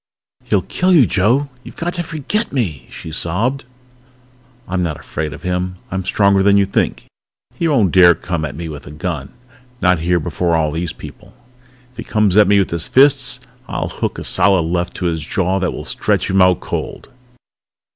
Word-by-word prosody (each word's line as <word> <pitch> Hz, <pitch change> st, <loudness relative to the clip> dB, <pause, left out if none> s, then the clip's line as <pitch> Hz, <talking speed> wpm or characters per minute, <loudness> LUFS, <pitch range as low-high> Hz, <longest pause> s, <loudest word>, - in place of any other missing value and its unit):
"He'll -, -, +1 dB
kill 185 Hz, +1 st, 0 dB
you, 150 Hz, -8 st, +6 dB
Joe! 115 Hz, +10 st, +2 dB, 0.2 s
You've -, -, -11 dB
got 175 Hz, +1 st, -3 dB
to 175 Hz, -, -2 dB
forget 165 Hz, -, -3 dB
me!" 100 Hz, -, -2 dB
she 80 Hz, -, -9 dB
sobbed. 105 Hz, -, -2 dB, 1.0 s
"I'm 90 Hz, 0 st, -1 dB
not 80 Hz, -4 st, -2 dB
afraid 75 Hz, +1 st, -4 dB
of 75 Hz, -, -10 dB
him. 90 Hz, 0 st, -2 dB, 0.2 s
I'm 95 Hz, 0 st, -2 dB
stronger 100 Hz, -1 st, +3 dB
than 100 Hz, +1 st, +4 dB
you 100 Hz, -, +4 dB
think. 100 Hz, -, -1 dB, 0.5 s
He 170 Hz, -, -1 dB
won't 115 Hz, -, +2 dB
dare 85 Hz, -2 st, +6 dB
come 85 Hz, -3 st, -4 dB
at 75 Hz, -, -4 dB
me 85 Hz, +1 st, -6 dB
with 75 Hz, -2 st, -9 dB
a -, -, -9 dB
gun, 75 Hz, -2 st, -5 dB, 0.5 s
not 90 Hz, -4 st, +3 dB
here 85 Hz, +2 st, +1 dB
before 85 Hz, +2 st, -1 dB
all 80 Hz, -2 st, +1 dB
these 85 Hz, +2 st, -3 dB
people. -, -, -12 dB, 0.6 s
If 125 Hz, -, -30 dB
he -, -, -5 dB
comes 105 Hz, -4 st, +1 dB
at 105 Hz, -2 st, +6 dB
me 100 Hz, +1 st, +4 dB
with 100 Hz, -, +1 dB
his 85 Hz, -1 st, -2 dB
fists 135 Hz, -2 st, +4 dB, 0.3 s
I'll -, -, -3 dB
hook -, -, -3 dB
a -, -, -5 dB
solid 95 Hz, -4 st, +2 dB
left 85 Hz, +2 st, -2 dB
to 90 Hz, -, -4 dB
his 80 Hz, -2 st, -1 dB
jaw 95 Hz, +5 st, -1 dB
that 90 Hz, -2 st, 0 dB
will -, -, -7 dB
stretch -, -, 0 dB
him 95 Hz, 0 st, +3 dB
out 90 Hz, -2 st, +4 dB
cold!" -, -, -5 dB
90 Hz, 195 wpm, -18 LUFS, 85-110 Hz, 1.0 s, you